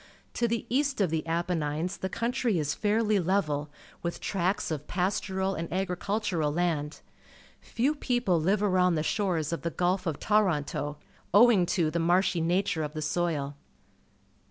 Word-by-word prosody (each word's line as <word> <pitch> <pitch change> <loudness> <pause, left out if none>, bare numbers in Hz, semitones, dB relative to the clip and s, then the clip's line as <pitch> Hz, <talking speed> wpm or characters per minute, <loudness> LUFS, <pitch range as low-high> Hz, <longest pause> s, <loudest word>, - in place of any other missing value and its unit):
To 240 - +1
the 235 0 -2
east 275 +1 0
of 190 -6 +2
the 160 -1 0
Apennines 165 0 -1
the 190 - -3
country 235 -1 0
is 150 -1 0
fairly 215 0 +1
level, 155 -5 0 0.3
mth 170 0 -3
tracts 190 -1 -1
of 150 -2 -4
pastoral 190 +1 -1
and 165 -2 -5
agricultural 185 -3 -1
land. 155 -3 -1 0.6
Few 260 +6 0
people 245 - 0
Uve 195 +5 +2
arovmd 185 -3 +3
the 155 - 0
shores 170 -6 0
of 170 - -3
the 170 - -1
Gulf 180 +2 0
of 160 - -2
Toronto, 150 -8 0 0.4
owing 210 -5 +6
to 165 -4 +1
the 170 - -1
marshy 175 +1 +2
nature 175 0 +1
of 150 -1 -4
the 155 - -4
soil. 150 -3 -1
180 Hz, 155 wpm, -28 LUFS, 160-200 Hz, 0.6 s, owing